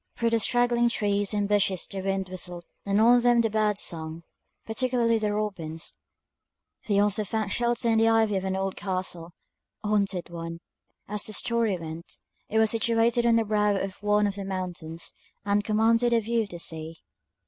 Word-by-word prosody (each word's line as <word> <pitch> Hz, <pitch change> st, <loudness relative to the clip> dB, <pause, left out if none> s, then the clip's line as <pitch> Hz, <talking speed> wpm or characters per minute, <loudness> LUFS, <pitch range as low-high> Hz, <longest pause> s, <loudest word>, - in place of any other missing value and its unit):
Through 230 Hz, 0 st, 0 dB
the 230 Hz, -, +3 dB
straggling 240 Hz, +1 st, +3 dB
trees 205 Hz, -3 st, 0 dB
and 205 Hz, -1 st, 0 dB
bushes 200 Hz, -3 st, +1 dB
the 195 Hz, -1 st, -6 dB
wind 195 Hz, 0 st, -1 dB
whistled, 180 Hz, -1 st, -6 dB, 0.2 s
and 200 Hz, +1 st, +2 dB
on 240 Hz, +2 st, +6 dB
them 240 Hz, 0 st, +4 dB
the 225 Hz, -2 st, 0 dB
birds 210 Hz, -1 st, +1 dB
sung, 160 Hz, 0 st, -5 dB, 0.4 s
particularly 235 Hz, 0 st, +1 dB
the 210 Hz, -1 st, 0 dB
robins; 180 Hz, -7 st, -4 dB, 0.9 s
they 205 Hz, -2 st, +2 dB
also 205 Hz, +1 st, +2 dB
found 210 Hz, 0 st, -2 dB
shelter 240 Hz, 0 st, 0 dB
in 225 Hz, -1 st, +3 dB
the 225 Hz, 0 st, +4 dB
ivy 220 Hz, -2 st, +3 dB
of 190 Hz, -, -1 dB
an 190 Hz, 0 st, -1 dB
old 190 Hz, 0 st, -2 dB
castle, 185 Hz, -3 st, -4 dB, 0.5 s
a 210 Hz, -, -2 dB
haunted 195 Hz, -4 st, 0 dB
one, 165 Hz, 0 st, -6 dB, 0.5 s
as 210 Hz, 0 st, -4 dB
the 215 Hz, -, -4 dB
story 230 Hz, -3 st, +1 dB
went; 165 Hz, 0 st, -8 dB, 0.3 s
it 220 Hz, -, 0 dB
was 220 Hz, -1 st, +4 dB
situated 230 Hz, +1 st, +2 dB
on 230 Hz, -, +5 dB
the 225 Hz, -1 st, +2 dB
brow 210 Hz, -1 st, +2 dB
of 195 Hz, 0 st, -4 dB
one 210 Hz, 0 st, +3 dB
of 200 Hz, -, 0 dB
the 200 Hz, -, -4 dB
mountains, 180 Hz, -4 st, -5 dB, 0.3 s
and 205 Hz, 0 st, +2 dB
commanded 230 Hz, +3 st, +3 dB
a 230 Hz, -, +5 dB
view 230 Hz, +1 st, 0 dB
of 210 Hz, -, -4 dB
the 175 Hz, -, -7 dB
sea. 160 Hz, -1 st, -5 dB
205 Hz, 185 wpm, -27 LUFS, 185-225 Hz, 0.9 s, on